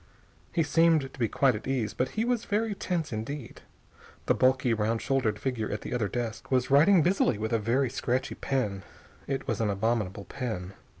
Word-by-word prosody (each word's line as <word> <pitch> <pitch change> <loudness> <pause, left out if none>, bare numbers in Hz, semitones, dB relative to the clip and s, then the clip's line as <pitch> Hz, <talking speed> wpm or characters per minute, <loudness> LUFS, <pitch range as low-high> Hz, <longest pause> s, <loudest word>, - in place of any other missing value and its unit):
He 165 - +2
seemed 160 -2 +3
to - - -14
be 115 - +2
quite 135 +3 +3
at 105 +3 -6
ease, 125 -5 -1
but 130 +1 -1
he 225 - +2
was 240 -2 0
very 215 +1 0
tense 170 - -2
indeed. 115 +4 -6 0.6
The - - +3
bulky, 130 -2 +3
round 110 +1 0
shouldered 130 -7 0
figure 115 -2 -2
at 105 - -3
the - - -5
other 115 -4 0
desk 115 0 -4
was 130 0 +1
writing 160 +5 +6
busily 175 - +2
with 110 +2 -3
a 115 - +3
very 120 +4 +1
scratchy 130 0 -1
pen. 105 -8 -2 0.5
It 135 -1 -3
was 115 -1 -1
an 110 - +1
abominable 100 -1 -1
pen. 100 -8 -5
125 Hz, 190 wpm, -28 LUFS, 110-140 Hz, 0.6 s, writing